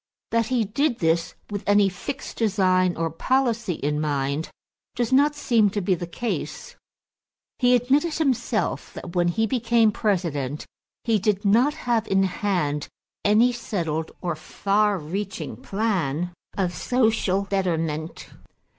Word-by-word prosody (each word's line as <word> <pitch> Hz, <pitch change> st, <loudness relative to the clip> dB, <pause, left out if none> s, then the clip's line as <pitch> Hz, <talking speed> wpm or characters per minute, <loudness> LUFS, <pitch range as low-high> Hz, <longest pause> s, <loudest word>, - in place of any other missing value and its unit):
That 230 Hz, -1 st, +2 dB
he 245 Hz, -2 st, +1 dB
did 240 Hz, +5 st, 0 dB
this 165 Hz, 0 st, 0 dB, 0.2 s
with 205 Hz, -1 st, -3 dB
any 205 Hz, 0 st, +5 dB
fixed 230 Hz, +9 st, -6 dB
design 185 Hz, -4 st, +2 dB
or 165 Hz, 0 st, -1 dB
policy 235 Hz, -, 0 dB
in 150 Hz, +1 st, -1 dB
mind 145 Hz, +1 st, -1 dB, 0.5 s
does 240 Hz, +1 st, 0 dB
not 290 Hz, +2 st, +4 dB
seem 230 Hz, -7 st, +3 dB
to 205 Hz, -, -2 dB
be 195 Hz, 0 st, +1 dB
the 175 Hz, -1 st, -3 dB
case. 235 Hz, +7 st, -4 dB, 0.8 s
He 250 Hz, 0 st, +5 dB
admitted 275 Hz, +7 st, +2 dB
himself 245 Hz, -7 st, -1 dB
that 175 Hz, -, -8 dB
when 175 Hz, -1 st, +3 dB
he 220 Hz, +6 st, +1 dB
became 230 Hz, -2 st, +3 dB
President 165 Hz, -, -1 dB, 0.4 s
he 225 Hz, -3 st, +2 dB
did 205 Hz, 0 st, 0 dB
not 240 Hz, +9 st, +4 dB
have 235 Hz, -2 st, +1 dB
in 195 Hz, 0 st, +3 dB
hand 180 Hz, -7 st, -1 dB, 0.4 s
any 220 Hz, +4 st, +5 dB
settled 165 Hz, -9 st, -3 dB
or 175 Hz, -3 st, -2 dB
far 200 Hz, +5 st, +1 dB
reaching 190 Hz, +5 st, -5 dB
plan 180 Hz, -6 st, -1 dB, 0.2 s
of 180 Hz, -3 st, 0 dB
social 220 Hz, -1 st, +1 dB
betterment. 165 Hz, -5 st, -2 dB
200 Hz, 135 wpm, -24 LUFS, 175-230 Hz, 0.8 s, any